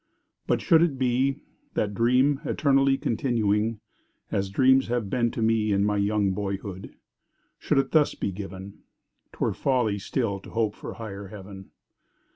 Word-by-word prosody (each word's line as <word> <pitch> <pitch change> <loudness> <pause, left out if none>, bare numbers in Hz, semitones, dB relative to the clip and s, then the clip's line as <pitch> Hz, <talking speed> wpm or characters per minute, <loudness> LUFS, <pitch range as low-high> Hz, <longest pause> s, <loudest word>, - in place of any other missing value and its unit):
But - - +1
should 165 -4 +5
it 165 -6 +1
be—that 130 -4 -2
dream 125 +6 +2
eternally 135 -2 +2
Continuing—as 110 -4 -2
dreams 130 +6 +4
have 120 -4 -2
been 120 -1 +1
to 115 - -3
me 110 -1 +2
In 100 0 +2
my 105 0 +1
young 100 -1 +1
boyhood—should 95 +3 -6
it 135 0 +1
thus 155 -2 +3
be 100 - -2
given, 95 0 -8 0.5
'Twere - - -1
folly 120 -7 0
still 100 -1 -2
to - - -13
hope 110 -2 0
for - - -8
higher 100 -3 -7
Heaven! 95 -1 -11
110 Hz, 135 wpm, -26 LUFS, 100-130 Hz, 0.5 s, should